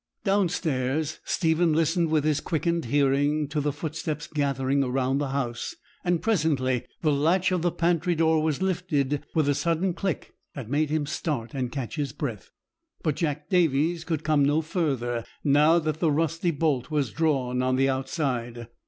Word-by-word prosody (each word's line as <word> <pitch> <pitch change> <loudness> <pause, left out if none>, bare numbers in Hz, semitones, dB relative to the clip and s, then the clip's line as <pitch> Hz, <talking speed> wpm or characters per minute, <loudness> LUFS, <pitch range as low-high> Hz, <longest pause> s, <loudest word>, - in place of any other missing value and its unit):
Down 195 -3 +2
stairs 150 -2 -1
Stephen 165 0 +2
listened 165 +1 +2
with 155 -2 +2
his 155 -1 +2
quickened 170 0 -1
hearing 145 +3 +2
to 150 0 -1
the 145 +1 0
footsteps 150 0 -4
gathering 140 -2 0
round 135 +2 0
the 145 - -1
house; 125 -4 -3 0.3
and 175 -2 0
presently 145 - +1 0.2
the 155 - +3
latch 165 +7 +2
of 180 -2 +1
the 175 0 +1
pantry 170 +1 +1
door 160 -1 +3
was 155 +2 0
lifted 155 -7 0
with 155 -3 +2
a 145 - +3
sudden 170 +5 0
click 190 -1 -3 0.2
that 130 -5 -7
made 150 +1 +1
him 155 -1 0
start 140 -5 -3
and 130 -3 -2
catch 135 +1 -5
his 140 -3 -2
breath; 135 -9 -5 0.5
but 155 -4 +1
Jack 150 -2 -2
Davies 165 -1 +2
could 160 -3 -2
come 155 -2 +3
no 145 +3 +3
further, 135 - -1 0.2
now 150 +3 +5
the 160 0 0
rusty 165 +3 0
bolt 145 -5 0
was 145 -7 0
drawn 130 -5 0
on 130 0 +1
the 135 +1 +3
outside. 130 -4 -2
150 Hz, 170 wpm, -26 LUFS, 135-165 Hz, 0.5 s, now